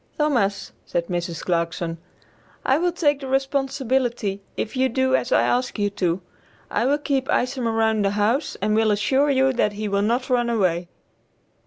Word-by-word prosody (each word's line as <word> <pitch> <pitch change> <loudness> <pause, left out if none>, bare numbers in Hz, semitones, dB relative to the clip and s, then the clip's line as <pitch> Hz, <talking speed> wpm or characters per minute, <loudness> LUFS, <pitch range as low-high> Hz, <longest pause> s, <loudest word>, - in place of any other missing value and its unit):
"Thomas," 240 -10 0
said 170 -1 -2
Mrs. 175 -2 -3
Clarkson, 170 -1 -1 0.7
"I 265 +3 +3
will 355 +1 +1
take 295 -5 +1
the 270 - -7
responsibility 265 -6 0 0.2
if 220 - -3
you 260 0 +2
do 260 +1 +2
as 245 - -1
I - - +4
ask 250 0 0
you 205 -1 0
to; 180 -2 -1 0.5
I 235 - +1
will 285 +2 +3
keep 280 -2 -1
Isom 250 -2 0
around 220 -1 +1
the 195 - +2
house 210 +8 0
and 210 +1 +2
will 220 0 +3
assure 265 +8 +2
you 265 -1 +3
that 210 -4 +1
he 210 +1 -4
will 200 0 +1
not 235 +5 0
run 240 -1 +2
away." 180 -6 +1
235 Hz, 175 wpm, -23 LUFS, 200-265 Hz, 0.7 s, I